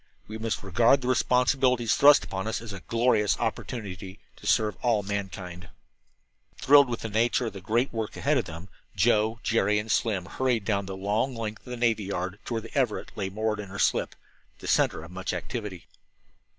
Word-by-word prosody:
We 110 +1 -7
must 110 -1 -3
regard 115 +8 +3
the 125 - -4
responsibilities 125 -1 +2
thrust 145 +1 +7
upon 95 +2 -4
us 110 - -1
as 115 -2 -8
a 95 - -7
glorious 115 0 +1
opportunity 100 -5 -4 0.2
to - - -9
serve 105 -1 +2
all 115 -4 +2
of 95 - -13
mankind." 95 -4 -5 0.9
Thrilled 140 -1 +6
with 120 - -3
the - - -3
nature 115 +3 +1
of 115 - -4
the 95 - -8
great 115 +7 0
work 110 -2 -4
ahead 140 0 +2
of - - -3
them, 80 +4 -9 0.3
Joe, 110 +2 +2
Jerry 105 -2 +2
and 105 +1 -2
Slim 100 -6 0
hurried 120 0 -1
down 100 -2 0
the 95 0 -6
long 105 +7 -1
length 110 +1 -6
of - - -8
the 125 - -5
navy 115 -3 +1
yard 95 0 -4
to 120 - -3
where 115 - -1
the - - -12
Everett 130 -6 -1
lay 95 -2 -3
moored 105 +2 -2
to 105 - -6
her 95 +1 -8
slip, - - +1 0.4
the - - -12
center 80 - +2
of 85 - -11
much 95 +1 -4
activity. 105 -7 -5
110 Hz, 200 wpm, -27 LUFS, 100-120 Hz, 0.9 s, thrust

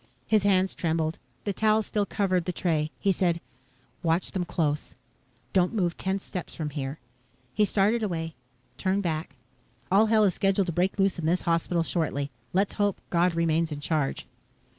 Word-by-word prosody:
His 215 -1 +3
hands 190 -1 +3
trembled. 160 -1 -1 0.2
The 200 - -1
towel 215 +2 +3
still 205 -1 -1
covered 185 -4 0
the 180 - -1
tray. 160 -4 0
He 200 - +2
said, 175 -3 +1 0.6
"Watch 170 +1 +1
them 185 -3 -1
close. 150 -3 -1 0.6
Don't 180 +3 +2
move 175 -5 +1
ten 190 +1 -1
steps 185 -2 -6
from 155 -3 -3
here." 140 0 -4 0.6
He 210 - +3
started 210 +3 +2
away 165 -6 -2 0.5
turned 195 +1 +1
back. 155 -4 -2 0.6
"All 210 +4 +5
hell 215 -1 +4
is 195 -3 +3
scheduled 195 +1 +2
to 175 - -3
break 180 +5 +1
loose 195 -2 +2
in 160 - -1
this 175 +2 +2
hospital 170 0 +1
shortly. 145 -4 -1 0.2
Let's 195 +2 +1
hope 205 -2 +1
God 175 0 +3
remains 165 -1 +1
in 145 - -4
charge." 150 -2 -1
180 Hz, 170 wpm, -27 LUFS, 165-195 Hz, 0.6 s, All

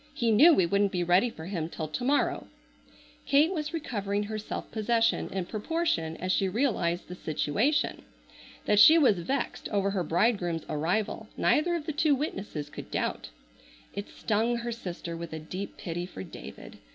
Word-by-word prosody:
He 235 -2 +1
knew 290 +11 +8
we 190 - +4
wouldn't 200 +3 +2
be 180 -2 0
ready 180 +7 +3
for 160 -7 -10
him 170 -4 -3
till 160 -2 -5
to 155 +11 -4
morrow." 285 +3 +1 0.8
Kate 295 +6 +4
was 310 -3 -3
recovering 205 - -2
her 215 +1 -4
self 210 - -6
possession 225 +1 +1
in 190 -2 -3
proportion 215 - -1
as 185 +1 -2
she 190 0 +2
realized 185 -7 0
the 180 - -7
situation. 180 - 0 0.6
That 210 -1 +3
she 315 +9 +9
was 250 - +4
vexed 260 +9 -3
over 200 -1 +1
her 195 -2 -1
bridegroom's 175 -1 +1
arrival 180 +8 -1
neither 345 +3 +2
of 320 -3 -4
the 315 - -2
two 300 0 +3
witnesses 195 - -4
could - - -9
doubt. - - -2 0.6
It 200 0 -5
stung 225 +2 0
her 235 0 -3
sister 180 -6 -6
with 165 -1 -7
a - - -3
deep 185 +6 -6
pity 175 0 -4
for 95 - -8
David. 70 -6 -11
205 Hz, 175 wpm, -28 LUFS, 175-245 Hz, 0.8 s, she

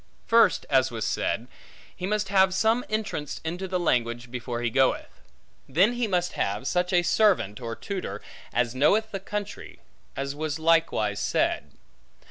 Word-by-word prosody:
First, 230 -4 +4
as 130 -2 +3
was 115 -2 -4
said, 115 +2 -1 0.5
he 180 - -4
must 210 -1 -1
have 190 -1 +4
some 225 +4 +2
entrance 210 -9 -3
into 175 +4 -3
the 185 0 -1
language 120 -6 0
before 120 -1 -4
he 120 - 0
goeth. 135 +1 0 0.5
Then 185 - +4
he 240 -1 -1
must 180 -3 0
have 100 +5 -2
such 180 +4 0
a 175 -1 +3
servant, 175 - +2
or 115 -1 -4
tutor, 185 - -5 0.3
as 120 -1 0
knoweth 205 +12 +2
the 195 - -3
country, 205 +1 -6 0.4
as 140 0 -3
was 155 0 -3
likewise 160 -11 +2
said. - - 0
165 Hz, 155 wpm, -26 LUFS, 125-195 Hz, 0.5 s, First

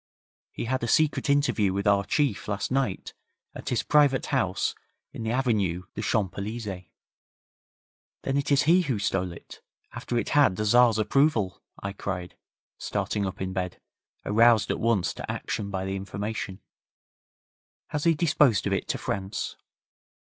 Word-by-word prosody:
He - - -5
had 130 +3 -1
a 115 - -1
secret 150 +2 +2
interview 140 -9 +2
with 100 +1 -2
our 100 -1 +4
Chief 140 0 0
last 100 +2 -2
night 130 -7 -1 0.4
at - - -6
his - - 0
private 145 -3 +3
house - - 0 0.4
in - - -7
the 110 - -2
Avenue 105 -9 0
des 105 - -4
Champs 105 -3 0
Elysées.' 100 -3 -5 1.4
'Then 135 - -1
it 140 +1 0
is 140 0 +4
he 170 +5 +5
who 135 -9 -1
stole 95 -3 -1
it, 85 - -12 0.3
after 120 - -3
it 120 - -1
had 145 -10 +4
the 105 - -2
Tzar's 120 0 +5
approval!' 110 - +1 0.2
I 100 0 -3
cried, 90 -3 -5 0.4
starting 100 -2 -2
up 95 - -6
in 95 0 -3
bed, 90 -1 -3 0.5
aroused 115 +1 +4
at - - -2
once 115 -6 +1
to - - -5
action 100 - -4
by 95 -1 -3
the 95 0 -2
information. 100 0 -5 1.3
'Has 150 +1 -2
he 165 -1 +5
disposed 150 - +3
of 100 - 0
it 95 - -1
to - - -1
France?' 100 +1 -3
105 Hz, 160 wpm, -27 LUFS, 95-135 Hz, 1.4 s, he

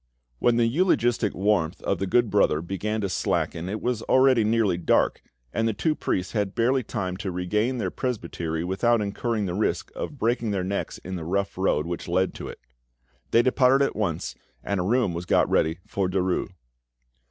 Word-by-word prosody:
When 120 -1 +3
the 120 - +4
eulogistic 120 - +2
warmth 95 -4 +1
of 100 - 0
the 95 - -1
good 120 +2 +2
brother 100 -7 +3
began 105 +4 -2
to 100 - 0
slacken 85 -1 -1
it 105 +2 -3
was 120 -3 -1
already 130 -2 +4
nearly 110 -3 +2
dark, 85 - +2 0.3
and 115 +1 +1
the 110 - -1
two 155 +8 +1
priests 90 -10 -2
had 100 -3 -1
barely 130 +3 +2
time 95 -6 -4
to 100 0 -4
regain 105 +8 -1
the 115 - -2
presbytery 85 -9 -3
without 115 +6 +2
incurring 105 +1 -1
the 90 - -3
risk 105 +4 -1
of 145 - -5
breaking 115 -1 0
their 100 -3 -1
necks 100 +2 -3
in 95 0 -6
the 85 - -6
rough 100 +4 -1
road 90 -5 +1
which 85 0 -5
led 95 +2 +1
to - - -7
it. - - -8 0.7
They 115 - +4
departed 130 +2 +4
at - - -3
once, 85 - -2 0.3
and 100 -1 -1
a - - 0
room 115 -1 +1
was 85 +1 -5
got - - +3
ready 80 +1 +1
for 100 -3 -1
Derues. 95 -1 0
100 Hz, 190 wpm, -25 LUFS, 90-115 Hz, 0.7 s, the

